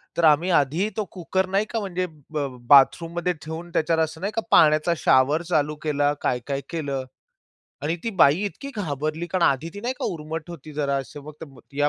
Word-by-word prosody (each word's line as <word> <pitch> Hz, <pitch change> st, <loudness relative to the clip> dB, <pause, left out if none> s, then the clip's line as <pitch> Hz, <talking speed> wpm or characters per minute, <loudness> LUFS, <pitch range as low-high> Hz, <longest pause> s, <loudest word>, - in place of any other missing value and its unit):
तर 170 Hz, -, +2 dB
आम्ही 160 Hz, +4 st, +4 dB
आधी 165 Hz, +5 st, +2 dB
तो 215 Hz, -, +1 dB
कुकर 190 Hz, +1 st, -1 dB
नाही 195 Hz, +2 st, +1 dB
का, 225 Hz, +1 st, -3 dB
म्हणजे 185 Hz, -3 st, -2 dB, 0.3 s
ब 150 Hz, -2 st, -1 dB, 0.2 s
बाथरूममध्ये 165 Hz, +5 st, +4 dB
ठेवून 160 Hz, +2 st, -7 dB
त्याच्यावर 160 Hz, 0 st, +1 dB
असं 160 Hz, +2 st, -5 dB
नाही 200 Hz, -, -2 dB
का, 225 Hz, -, +1 dB
पाण्याचा 155 Hz, +2 st, +5 dB
शॉवर 140 Hz, +5 st, +3 dB
चालू 150 Hz, -2 st, +1 dB
केला, 145 Hz, -1 st, +1 dB
काय-काय 135 Hz, +3 st, -1 dB
केलं 140 Hz, -5 st, -3 dB, 0.8 s
आणि 160 Hz, +3 st, -1 dB
ती 230 Hz, -, -1 dB
बाई 150 Hz, 0 st, +5 dB
इतकी 275 Hz, +7 st, -6 dB
घाबरली 155 Hz, -2 st, -3 dB
कारण 185 Hz, 0 st, -1 dB
आधी 140 Hz, +4 st, +1 dB
ती 205 Hz, -, -7 dB
नाही 245 Hz, +4 st, -2 dB
का, -, -, -6 dB
उर्मट 160 Hz, +1 st, -6 dB
होती 155 Hz, -2 st, -10 dB
जरा 140 Hz, -2 st, 0 dB
असं 135 Hz, +2 st, -6 dB
मग 150 Hz, -2 st, -11 dB, 0.2 s
या 145 Hz, 0 st, +3 dB
160 Hz, 185 wpm, -24 LUFS, 145-175 Hz, 0.8 s, पाण्याचा